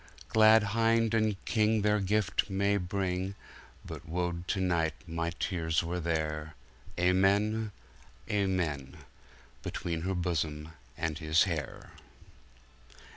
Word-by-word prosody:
Glad 110 0 +6
Hinde 115 0 +3
and 110 -3 0
KingTheir 105 -2 +2
Gyfte 100 -1 +1
may 100 +1 +2
bring, 95 0 -2 0.5
But - - -8
wo'd 90 +1 -2
to 100 - 0
night 85 -4 +1
my 85 0 -2
Teares 85 -2 -1
were 85 +2 -2
there, 80 -2 -2 0.4
Amen, 100 +4 +2 0.6
Amen:Between 85 -2 -4
her 95 +2 -1
Bosom 80 -3 -2 0.3
and 80 -1 -2
His 80 0 +4
hayre! 85 -6 -4
90 Hz, 100 wpm, -30 LUFS, 80-105 Hz, 0.6 s, Glad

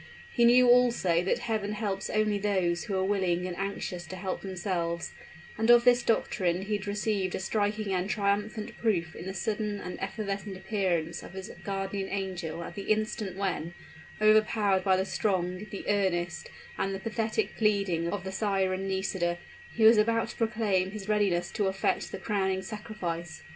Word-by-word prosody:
He 235 - +4
knew 250 +1 +7
also 235 -9 +4
that 190 - +1
Heaven 220 -3 -2
helps 205 -2 -2
only 215 -1 +1
those 185 -4 0
who 200 -4 -1
are 190 - +1
willing 185 -3 +1
and 180 -1 -4
anxious 185 -3 -4
to 185 - -6
help 185 0 -4
themselves; 175 -3 -2 0.5
and 225 +1 +1
of 240 0 +8
this 245 0 +5
doctrine 185 -6 +1
he 210 +1 -1
had 205 0 -9
received 205 -2 -1
a - - -3
striking 205 +1 -1
and 185 +1 -1
triumphant 210 +1 -1
proof 175 -8 0
in 175 - -7
the 190 - -3
sudden 210 +1 -2
and 180 - -7
evanescent 195 -1 -4
appearance 185 -4 -1
of - - -11
his 190 +1 -7
guardian 195 0 -3
angel 180 -4 -3
at - - -7
the 200 +1 -7
instant 215 -3 -1
when, 175 -4 -2 0.4
overpowered 215 -2 +4
by 190 -1 +4
the 190 - 0
strong, 190 -1 -1
the 200 - -7
earnest, 175 -4 0 0.3
and 195 0 0
the - - -5
pathetic 220 +1 -1
pleading 200 -6 +1
of 205 -3 -3
the 190 - -4
siren 190 -1 0
Nisida, 190 -2 -1 0.3
he 225 - -1
was 220 +1 +8
about 230 +1 +2
to - - -8
proclaim 215 -5 +1
his 205 0 -7
readiness 195 -5 +1
to 205 -3 0
effect 190 0 0
the - - -4
crowning 190 -3 -1
sacrifice. 175 -6 -5
195 Hz, 175 wpm, -29 LUFS, 185-215 Hz, 0.5 s, of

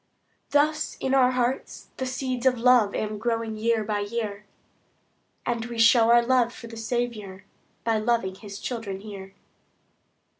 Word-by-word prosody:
Thus 305 +2 +1
in 265 - -1
our 260 -2 +5
hearts 255 +1 -2
the 260 - -2
seeds 255 0 -1
of 250 -1 +3
love 240 -4 +4
Am 215 -1 -3
growing 230 -1 -1
year 225 0 +1
by 210 0 -1
year; 210 -1 -4 1.0
And 235 -1 -1
we 235 -1 -7
show 225 0 +6
our 235 0 +6
love 250 -1 +3
for 235 - -11
the 230 0 -9
Saviour, 225 -4 -3 0.4
By 225 -1 +1
loving 220 -4 0
His 200 +1 -9
children 210 -4 -5
here. 195 -2 -9
230 Hz, 150 wpm, -26 LUFS, 210-250 Hz, 1.0 s, show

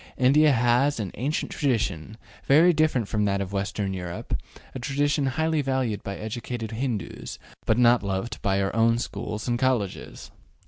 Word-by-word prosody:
India 145 +4 +5
has 125 +3 +2
an 100 -5 -3
ancient 140 +7 -2
tradition, 110 - -1 0.3
very 165 +6 +6
different 150 -8 +1
from 105 -1 0
that 100 -1 +1
of 100 0 -4
Western 100 0 -2
Europe, 90 -2 -4 0.4
a - - -5
tradition 145 +2 0
highly 160 +3 0
valued 130 -6 -1
by 100 0 -5
educated 115 +1 -5
Hindoos, 115 -4 -4 0.3
but 110 - +3
not 120 0 +5
loved 100 +3 -3
by 95 -1 +1
our 115 +4 +2
schools 105 -2 -5
and 120 -1 0
colleges. 125 -7 -2
120 Hz, 150 wpm, -25 LUFS, 105-135 Hz, 0.4 s, very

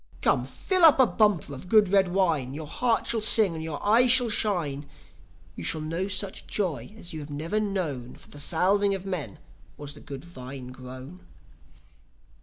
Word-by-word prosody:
Come, - - +2
fill 370 -2 0
up 315 -4 +7
a 260 - +7
bumper 195 -7 +1
of 140 +7 -10
good 215 -3 +4
red 195 -1 +3
wine, 165 -8 0
Your 155 +1 -6
heart 230 +9 -1
shall 225 -2 -1
sing, 215 -3 +6
and 160 -1 -6
your 160 -3 -5
eye 230 +4 +5
shall 245 -1 +5
shine, 160 -10 -1 0.7
You - - -8
shall 155 - 0
know 165 +5 -3
such 190 0 -3
joy 185 - -3
as 175 -5 -9
you 155 -2 -6
never 160 +8 -3
have 215 -1 0
known. 145 -11 -4
For - - -16
the 145 - -10
salving 195 +6 +2
of 190 0 -8
men 165 - -5 0.4
was 145 -1 -8
the - - -14
good 140 -1 -9
vine 130 -6 -10
grown." 130 +7 -11
175 Hz, 185 wpm, -26 LUFS, 145-205 Hz, 0.7 s, up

